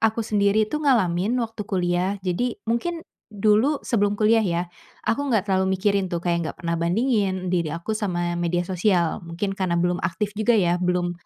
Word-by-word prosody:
aku 225 0 +1
sendiri 210 0 +2
itu 300 +8 -4
ngalamin 220 - +2
waktu 225 -1 -9
kuliah, 180 +1 0
jadi 225 +7 -1
mungkin 325 +9 -2 0.2
dulu 215 +7 +2
sebelum 205 -3 +1
kuliah 225 +2 +4
ya, 175 -5 0 0.4
aku 280 +7 0
gak 210 -4 +2
terlalu 190 0 +2
mikirin 200 -1 +1
tuh 170 -1 -2
kayak 170 -2 0
gak - - -32
pernah 170 0 0
bandingin 190 -1 0
diri 170 -3 +1
aku 170 +6 -4
sama 175 -5 -1
media 175 +1 0
sosial, 180 -2 +1
mungkin 170 +4 -3
karena 185 -3 0
belum 175 +1 0
aktif 185 +5 -2
juga 225 +2 +3
ya, 175 -3 +2
belum, 180 -1 0
195 Hz, 175 wpm, -23 LUFS, 175-220 Hz, 0.4 s, kuliah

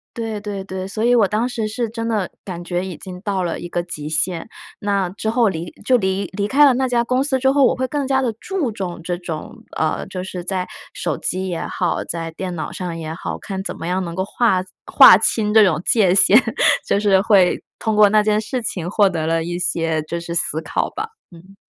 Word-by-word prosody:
对 225 -2 -4
对 205 -2 -5
对， 190 -1 -5
所 215 +3 -4
以 240 +1 +4
我 225 -5 +4
当 215 +5 0
时 230 -3 -2
是 230 +2 -3
真 230 0 -4
的 210 -5 -1
感 175 -3 -6
觉 175 +1 -2
已 185 -3 -6
经 180 +3 -9
到 195 -1 -2
了 170 -2 -3
一 175 - -6
个 175 0 -2
极 150 -4 -7
限。 165 +4 -1 0.3
那 200 -3 0
之 205 +4 -4
后 230 -1 +3
离 170 -1 -5
就 250 +4 +4
离 190 -2 -1
离 200 0 0
开 280 +7 +4
了 275 - +6
那 260 +1 +1
家 240 -1 +1
公 255 +2 0
司 270 -1 +1
之 265 +1 +2
后， 275 -1 +4
我 - - +3
会 260 - -1
更 280 +1 -2
加 265 0 +2
地 250 -3 0
注 365 -11 -2
重 185 -5 -5
这 175 +1 -2
种， 170 -3 -6 0.2
呃， 155 -1 -1
就 185 -1 -5
是 185 -1 -6
在 185 0 -2 0.3
手 - - -2
机 185 +1 -2
也 170 -2 -3
好， 175 -2 -1
在 165 -1 -4
电 180 +2 -5
脑 160 - -4
上 175 -3 -5
也 160 -1 -5
好， 165 - -5
看 190 -2 -5
怎 195 - -5
么 165 - -6
样 185 +2 0
能 170 -1 -6
够 190 - -1
划 195 -2 +1 0.3
划 185 - +9
清 210 0 +1
这 220 -1 +7
种 165 -4 +1
界 190 -6 +3
限， 200 +5 +6 0.5
就 - - +2
是 200 -2 +3
会 195 -3 +3 0.2
通 220 - -1
过 210 -1 +8
那 210 +1 +3
件 210 0 +2
事 245 +4 -3
情 175 -5 -3
获 205 0 +3
得 160 -3 -2
了 165 0 +1
一 175 +1 -4
些 165 -2 0
就 170 +2 -4
是 170 0 -6
思 165 -2 0
考 - - -2
吧。 435 +1 -4 0.2
嗯。 180 +3 -16
190 Hz, 255 characters per minute, -20 LUFS, 175-225 Hz, 0.5 s, 划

